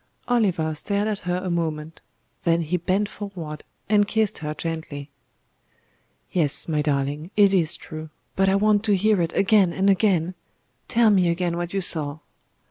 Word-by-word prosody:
Oliver 190 -10 +1
stared 200 +6 -1
at 210 -2 -2
her 175 - +1
a 185 - -2
moment; 160 -2 -3 0.4
then 170 0 +2
he 160 +3 -1
bent 185 +4 0
forward 175 -8 -7 0.2
and 205 -1 +3
kissed 215 -1 0
her 150 -1 -4
gently. 155 -4 -5 1.2
"Yes, 155 -6 +1
my 155 -2 0
darling; 145 +2 -1
it 200 -2 +5
is 170 -3 +2
true. 155 0 -8 0.3
But 195 0 +3
I 190 - +3
want 210 +1 +3
to 205 -2 +3
hear 205 0 +2
it 165 -1 -1
again 200 -3 +4
and 195 +3 +3
again. 185 -3 +2 0.5
Tell 230 -2 +4
me 185 -3 +4
again 170 0 0
what 175 0 -3
you 195 - -1
saw." 155 -5 -1
175 Hz, 165 wpm, -24 LUFS, 160-200 Hz, 1.2 s, it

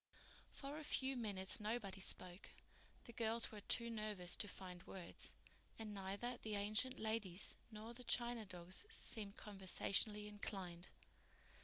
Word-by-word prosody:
For 285 +2 -3
a - - -6
few 270 -2 +2
minutes 200 -6 +1
nobody 210 -2 -1
spoke. 185 0 +3 0.5
The 235 - -10
girls 230 0 +2
were 210 -2 -6
too 235 +3 +2
nervous 210 -5 +1
to 205 - +1
find 180 -2 -6
words, 180 -3 -3 0.4
and 220 -2 -4
neither 200 +5 -1
the 215 -1 -1
ancient 215 +6 +2
ladies 215 -4 +1 0.2
nor 220 +1 -6
the 250 +1 -7
china 240 -1 +3
dogs 180 -2 -2
seemed 215 - -3
conversationally 210 +1 +2
inclined. 190 -4 -4
210 Hz, 135 wpm, -44 LUFS, 190-230 Hz, 0.5 s, spoke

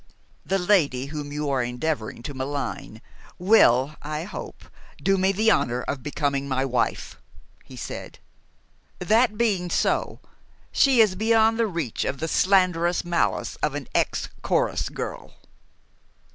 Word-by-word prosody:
"The 195 - 0
lady 170 -9 +2
whom 145 -1 -5
you 150 0 -3
are 135 -2 +1
endeavoring 125 -1 -3
to 145 - -6
malign, 130 -4 -5 0.3
will, 155 - +4
I 150 +1 -4
hope, 200 - -8 0.3
do 195 - +2
me 190 0 +2
the 220 +3 +3
honor 125 - +1
of 140 -2 -4
becoming 140 0 -2
my 130 0 0
wife," 125 -2 -2 0.4
he - - -13
said. - - -7 0.8
"That 215 +4 +2
being 200 -6 +1
so, - - 0 0.5
she 265 -4 +5
is 210 -4 +4
beyond 225 +2 +3
the 230 - +3
reach 165 - -3
of 135 0 -3
the 160 - -2
slanderous 180 -2 +2
malice 175 -1 -1
of 150 -1 -1
an 145 -3 -5
ex - - 0
chorus - - 0
girl." - - -7
160 Hz, 140 wpm, -24 LUFS, 135-195 Hz, 0.8 s, she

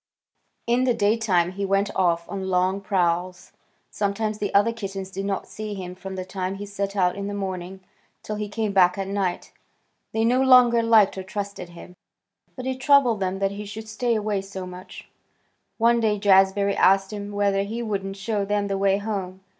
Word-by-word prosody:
In 240 +2 +2
the 245 -2 +2
daytime 205 -5 +2
he 200 +2 -5
went 195 +1 0
off 170 -2 +1
on 195 -1 -5
long 185 +1 +1
prowls. 180 -1 -1 0.4
Sometimes 210 +1 -2
the 205 - -2
other 205 +3 +3
kittens 195 -4 -6
did 195 +1 -4
not 200 -1 -2
see 215 -1 -6
him 180 -2 -6
from 190 +1 -8
the 185 -1 -5
time 185 0 -4
he 205 +1 -6
set 200 0 -4
out 180 -2 +2
in 200 0 -4
the 205 - -4
morning 190 -1 -5 0.4
till 215 - -4
he 210 -1 -4
came 215 0 -2
back 180 -1 +4
at 195 -1 -3
night. 195 -3 -2 0.6
They 225 0 0
no 250 +3 +3
longer 250 -3 +6
liked 220 -4 +4
or - - -5
trusted 200 -3 -6
him, 175 +1 -13 0.6
but 255 - -7
it 260 0 -3
troubled 265 -6 +4
them 190 0 -1
that 195 0 0
he 205 +1 -6
should 220 +2 -8
stay 230 +2 -1
away 210 -2 -1
so 195 -1 -7
much. 180 0 -10 0.7
One 235 +1 +3
day 215 -2 +1
Jazbury 195 0 +4
asked 195 +1 +3
him 205 0 -6
whether 200 -1 +1
he 225 +4 -4
wouldn't 195 -3 -3
show 205 +1 -2
them 205 0 -1
the 195 -1 -1
way 195 0 +3
home. 195 -3 -4
200 Hz, 195 wpm, -24 LUFS, 190-215 Hz, 0.7 s, longer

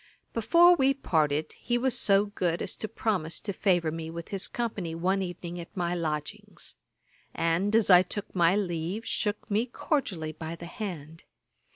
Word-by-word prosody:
] - - -44
Before 340 +10 +6
we 275 -3 +3
parted, 155 - 0
he 240 0 0
was 255 0 +1
so 200 -3 +4
good 180 -4 -1
as - - -4
to 215 - -4
promise 195 -7 -2
to 200 - -3
favour 175 -4 +1
me 160 0 -5
with 170 0 -7
his 195 -2 -1
company 205 -8 -3
one 185 +4 +1
evening 175 -1 -5
at 170 +3 -10
my 175 -1 0
lodgings; 155 -3 -5 0.6
and, 175 +6 +1
as 225 -3 +4
I 180 0 +9
took 205 +2 -5
my 175 0 +4
leave, 185 +2 -2
shook 210 -1 -2
me 220 +4 +1
cordially 200 - -2
by 160 +1 -6
the 170 - -9
hand. 165 -5 -7
180 Hz, 175 wpm, -28 LUFS, 165-215 Hz, 0.6 s, I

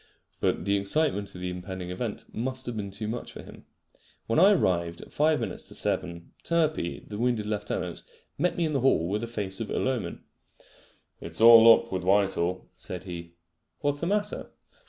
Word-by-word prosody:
But - - 0
the 100 0 +2
excitement 100 -2 +1
of 90 - -8
the 90 0 -3
impending 90 0 -6
event 105 +4 -4
must 130 +3 -1
have 120 - -4
been 100 -2 -4
too 100 +2 -5
much 120 +3 -5
for - - -9
him. - - -14 0.6
When 115 - +1
I 190 +4 +8
arrived 85 - 0
at - - -15
five 155 +1 +3
minutes - - -4
to - - -8
seven, 85 -1 -2
Turpey, 155 - 0
the 105 0 -6
wounded 120 -3 0
lieutenant, 100 -4 -3 0.3
met 180 - 0
me 170 - +1
in 155 - -2
the 140 - +1
hall 120 -10 +3
with 105 +3 -1
a 115 - -3
face 100 -4 -5
of 115 - -4
ill - - -1
omen. 130 -5 -3 1.0
"It's - - -6
all 115 0 +10
up 115 - -6
with 95 -1 -1
Whitehall," 95 -2 +1
said 90 -1 -4
he. 85 -2 -8 0.5
"What's 145 -1 0
the 170 - -2
matter?" 205 +1 -1
105 Hz, 190 wpm, -27 LUFS, 90-130 Hz, 1.0 s, all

